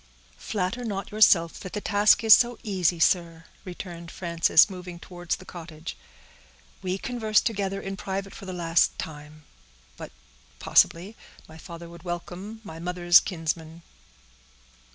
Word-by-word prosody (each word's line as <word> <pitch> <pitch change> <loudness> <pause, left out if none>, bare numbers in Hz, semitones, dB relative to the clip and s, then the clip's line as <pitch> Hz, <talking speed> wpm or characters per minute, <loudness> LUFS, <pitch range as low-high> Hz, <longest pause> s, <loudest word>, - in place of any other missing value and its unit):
"Flatter 210 +4 -3
not 200 -4 -4
yourself 185 -6 +4
that 185 - -9
the 210 - -2
task 205 +2 +3
is 220 -1 +9
so 240 0 +4
easy, 185 -5 0
sir," 165 -1 +1 0.2
returned 175 -2 -8
Frances, 170 -2 +3
moving 180 -3 -9
towards 175 -1 -5
the 185 - -14
cottage. 165 -3 -9 0.9
"We 185 0 -2
converse 220 -2 +1
together 195 -5 -2
in 195 0 -5
private 195 0 -5
for 195 - -11
the - - -4
last 170 -2 +1
time; 150 0 -9 0.5
but—possibly—my 155 - -2
father 170 -1 -10
would 170 0 -13
welcome 180 +5 -7
my 165 -6 -9
mother's 175 0 +4
kinsman." 165 -1 -5
180 Hz, 130 wpm, -26 LUFS, 165-195 Hz, 0.9 s, is